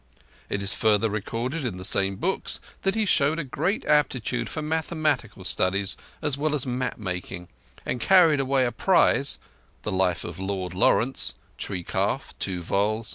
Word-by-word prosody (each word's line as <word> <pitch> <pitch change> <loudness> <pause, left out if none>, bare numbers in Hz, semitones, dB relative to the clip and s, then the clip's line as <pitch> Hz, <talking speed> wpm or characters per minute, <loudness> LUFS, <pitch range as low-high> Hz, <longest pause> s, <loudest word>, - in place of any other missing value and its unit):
It 100 0 -2
is 100 - +7
further 110 0 +2
recorded 115 +8 -3
in 110 -8 -3
the 90 - -5
same 95 0 +1
books 190 - -2 0.2
that 195 +1 +1
he 220 -1 +1
showed 155 -4 +3
a 165 - -1
great 160 +9 -2
aptitude 125 -5 +1
for 155 - -4
mathematical 155 - -1
studies 95 +2 0 0.3
as 145 -2 0
well 150 0 +1
as 140 - -2
map 125 0 -2
making, 90 -3 -5 0.4
and 125 - -2
carried 170 -6 +5
away 135 -1 +2
a 120 - 0
prize 140 - +3 0.5
(The - - -2
Life 95 -2 +1
of 85 +1 -7
Lord 95 -2 -3
Lawrence, 115 +7 +2 0.2
tree 90 -3 -2
calf, 100 +10 -1
two 90 -3 -3
vols. 105 +5 0
120 Hz, 165 wpm, -25 LUFS, 95-150 Hz, 0.5 s, is